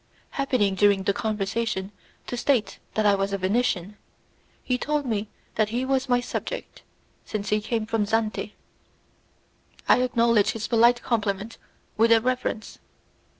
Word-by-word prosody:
Happening 255 -8 +1
during 200 0 +3
the 200 - +1
conversation 210 -1 -2 0.3
to - - -4
state 240 -5 0 0.2
that 215 - +1
I 205 - +6
was 195 0 0
a - - +1
Venetian, 200 -1 0 0.7
he 250 - 0
told 295 +1 -1
me 215 -3 -2 0.2
that 215 -1 +1
he 245 +3 -1
was 265 0 0
my 245 0 +4
subject, - - -5 0.4
since 205 -2 -4
he 210 0 +2
came 225 0 -2
from 220 -2 0
Zante. 215 -1 -1 1.3
I - - +5
acknowledged 235 -4 +3
his 220 -2 -4
polite 235 +1 +4
compliment 215 -1 -2 0.4
with 230 +1 +4
a 230 - +7
reverence. 250 -2 -2
220 Hz, 145 wpm, -25 LUFS, 205-245 Hz, 1.3 s, a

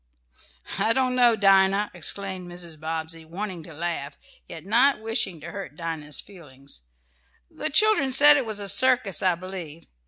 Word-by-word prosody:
"I 225 - +3
don't 255 0 0
know, 240 -2 +5
Dinah!" 195 0 +3
exclaimed 185 +1 -4
Mrs. 170 -3 -7
Bobbsey, 160 +1 -5
wanting 180 +2 -6
to 165 - -12
laugh, 160 -3 -3
and - - -25
yet 165 0 -10
not 245 +7 +3
wishing 220 -6 -3
to 170 +3 -8
hurt 195 -7 -8
Dinah's 160 -3 -4
feelings. 140 - -13 0.7
"The - - -4
children 415 -4 +3
said 290 +3 +7
it 270 -5 -1
was 215 -2 -3
a 200 -1 -6
circus, 245 -3 +2
I 185 -3 +2
believe. 170 -3 -9
190 Hz, 160 wpm, -24 LUFS, 165-225 Hz, 0.7 s, said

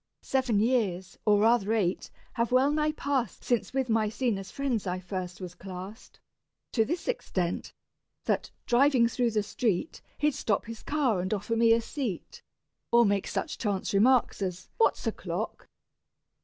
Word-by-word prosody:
Seven 260 -6 +1
years, 205 -6 0
or 205 -1 +4
rather 225 -1 +3
eight, 195 -5 0 0.2
have 235 -1 0
well 260 +3 +4
nigh 305 0 +1
passed 275 -5 -2
Since 240 -3 0
with 265 -1 0
Maecenas' 220 -2 0
friends 245 -4 -2
I 180 0 -1
first 185 -1 -5
was 180 -2 -7
classed, 190 +4 -9 0.5
To 225 - +3
this 340 +10 -3
extent, 185 - -2 0.5
that, - - 0 0.2
driving 250 -1 +4
through 240 0 +1
the 215 -2 0
street, 225 - -1 0.2
He'd 300 0 +2
stop 210 -5 0
his 230 0 -8
car 275 -10 +1
and 185 - -3
offer 210 +3 -2
me 230 0 +4
a 230 +1 +5
seat, 230 - -5 0.5
Or 235 0 +6
make 200 -1 +1
such - - -3
chance 200 -4 -1
remarks 240 +2 +3
as 185 -1 -4
"What's 455 - +2
o'clock?" - - -4
225 Hz, 155 wpm, -28 LUFS, 195-255 Hz, 0.5 s, Or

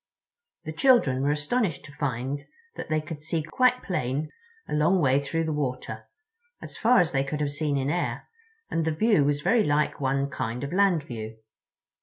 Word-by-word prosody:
The 155 - -6
children 165 - +4
were 140 - +1
astonished 160 - -1
to 145 - -11
find 140 0 -3 0.3
that - - -7
they 155 0 +1
could 150 0 -8
see 160 0 -2
quite 250 - +2
plain 150 - -2 0.4
a - - -5
long 160 +5 +3
way 140 -3 +3
through 165 +4 -1
the 160 -1 -1
water—as 330 - -7
far 240 0 +4
as 175 -1 0
they 135 -1 +1
could 150 +2 -4
have 145 -1 -1
seen 145 -1 -1
in 135 +1 0
air, 175 +2 -2 0.4
and 165 - 0
the 160 -1 -1
view 210 -4 +3
was 145 +1 +1
very 225 +7 +3
like 150 -2 0
one 135 +1 +1
kind 125 0 -3
of 140 - -4
land 185 -5 +3
view. 110 -3 -7
150 Hz, 185 wpm, -26 LUFS, 140-175 Hz, 0.4 s, children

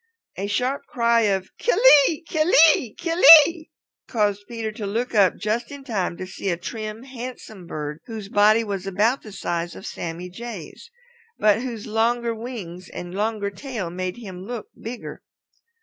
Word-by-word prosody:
A 195 +2 -4
sharp 255 +6 -1
cry 235 -1 +2
of 190 -1 -1
"Kill - - +1 0.3
ee, 325 0 -3
kill 315 +2 0 0.2
ee, 225 -5 -4
kill 335 +1 -3 0.2
ee!" 330 0 -6 0.4
caused 205 -3 0
Peter 230 -2 -4
to 210 -1 -6
look 235 +5 -2
up 200 -5 +4
just 225 +3 -2
in 280 -1 -9
time 200 -9 -2
to 185 - -5
see 190 +1 -5
a 170 - 0
trim, 215 +4 -6
handsome 245 -7 -9
bird 150 -1 -5
whose 220 -4 -7
body 215 +2 +4
was 195 -3 -4
about 215 +8 +1
the 215 - -11
size 175 -3 -3
of - - -10
Sammy 170 +1 -6
Jay's 210 - -9 0.5
but 215 +1 +3
whose 235 -4 -5
longer 230 +2 0
wings 215 -7 -8
and 175 0 -8
longer 205 0 -2
tail 215 -6 -6
made 180 +2 -4
him 190 -6 -9
look 230 +1 -7
bigger. 235 +2 -8
215 Hz, 165 wpm, -23 LUFS, 190-240 Hz, 0.5 s, up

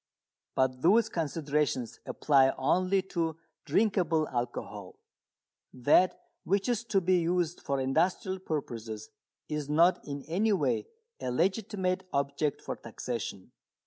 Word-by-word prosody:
But 130 -1 +1
those 220 +7 +5
considerations 150 - -1
apply 135 -3 +4
only 185 +7 +2
to 165 -3 0 0.3
drinkable 180 -7 +2
alcohol. 120 -5 -4 0.8
That 145 +8 +4 0.2
which 200 +3 +1
is 240 -2 0
to 205 -4 +2
be 180 0 +3
used 175 0 0
for 140 -1 -1
industrial 180 +8 +1
purposes 115 - -5 0.4
is 150 -2 -3
not 170 +5 +4
in 140 -1 -6
any 205 +7 +1
way 230 - 0 0.3
a - - -3
legitimate 190 - 0
object 140 +1 -1
for - - -4
taxation. 115 -6 -5
160 Hz, 115 wpm, -30 LUFS, 135-185 Hz, 0.8 s, those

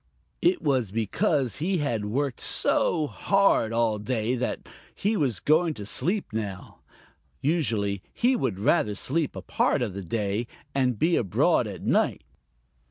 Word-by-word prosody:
It 355 0 +2
was 130 -8 +1
because 125 - 0
he 180 +5 0
had 115 -9 -1
worked 130 +4 -2
so 155 -3 +2
hard 195 - +2
all 115 -2 +1
day 115 +1 -1
that 125 0 -3 0.3
he 210 +3 0
was 130 - 0
going 160 +1 +2
to 105 - -7
sleep 175 - -1
now. 100 -5 -5 0.6
Usually 110 - 0
he 250 +2 +2
would 110 - -1
rather 105 - +2
sleep 150 +7 -1
a - - -7
part - - +1
of 105 -6 -3
the 100 - -5
day 105 +4 -2 0.3
and 130 -4 +1
be 165 +8 +2
abroad 95 -6 +2
at - - -8
night. - - +1
125 Hz, 150 wpm, -26 LUFS, 105-160 Hz, 0.6 s, It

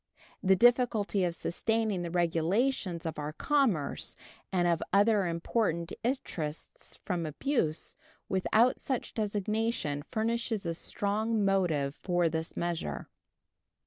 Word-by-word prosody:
The 190 -1 +5
difficulty 225 -3 +3
of 170 -1 -1
sustaining 220 +1 0
the 170 - -3
regulations 175 +3 0
of 160 -2 -3
our 150 +1 -3
commerce 225 - 0 0.4
and 175 -2 +2
of 170 -1 +2
other 200 0 +4
important 170 0 -1
interests 165 - -4
from 175 -2 -1
abuse 160 - -1 0.3
without 215 +6 +3
such 260 -3 -3
designation 210 -7 -1
furnishes 225 -2 -1
a 170 - -1
strong 210 +5 -1
motive 165 -8 +1
for 175 -2 +2
this 160 0 -4
measure. 165 - -3
190 Hz, 115 wpm, -30 LUFS, 165-225 Hz, 0.4 s, The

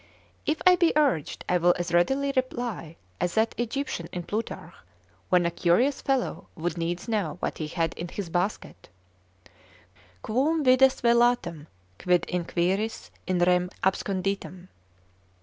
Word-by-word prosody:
If 310 +1 0
I 365 0 +7
be 340 -1 +3
urged, 280 - +1
I 180 - +3
will 175 +1 +4
as 175 -1 -3
readily 270 +11 +2
reply 240 -10 -3 0.2
as 180 - -1
that 220 +1 +2
Egyptian 240 -7 -3
in 180 - -4
Plutarch, 215 +6 -5 0.6
when 180 -1 +4
a 170 - +1
curious 210 +12 +2
fellow 270 -2 -1
would 170 0 -3
needs 170 +3 -3
know 200 -10 -1
what - - -3
he 155 - -3
had 165 0 -1
in 175 - -6
his 195 +1 -5
basket, 180 +5 -3 1.3
Quum 295 +8 +1
vides 260 0 +5
velatam, 235 -10 +2 0.3
quid 180 -2 +2
inquiris 180 +5 -1 0.2
in 185 -2 +1
rem 180 0 +3
absconditam? 190 -1 -2
185 Hz, 135 wpm, -26 LUFS, 175-245 Hz, 1.3 s, I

